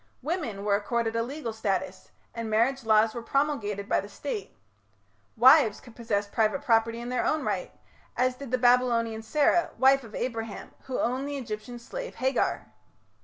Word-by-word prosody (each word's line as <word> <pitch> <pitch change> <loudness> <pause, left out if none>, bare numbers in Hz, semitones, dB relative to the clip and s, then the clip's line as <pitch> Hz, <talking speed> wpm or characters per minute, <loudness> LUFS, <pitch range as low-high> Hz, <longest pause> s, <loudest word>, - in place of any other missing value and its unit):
Women 255 - -3
were 205 - +2
accorded 225 +2 0
a 230 - +1
legal 245 -1 -4
status 205 -3 -3 0.2
and 230 -1 -4
marriage 240 +5 +1
laws 220 0 +4
were 235 - -5
promulgated 230 -7 -1
by - - +2
the - - -7
State. 445 -5 -6 0.8
Wives 245 -2 +6
could 240 -3 -16
possess 215 -4 -1
private 220 +7 0
property 230 -1 +2
in 240 +1 -6
their 250 - 0
own 310 - 0
right, - - -2 0.5
as 255 0 +2
did 265 +1 -9
the 255 - +1
Babylonian 240 -2 +2
Sarah, 295 +9 +2
wife 270 0 +5
of 220 -2 -11
Abraham, 225 -3 -4
who 260 -2 -3
owned 255 +4 -1
the 285 0 -4
Egyptian 230 -1 -6
slave - - -7
Hagar. 260 0 0
235 Hz, 170 wpm, -27 LUFS, 220-265 Hz, 0.8 s, Wives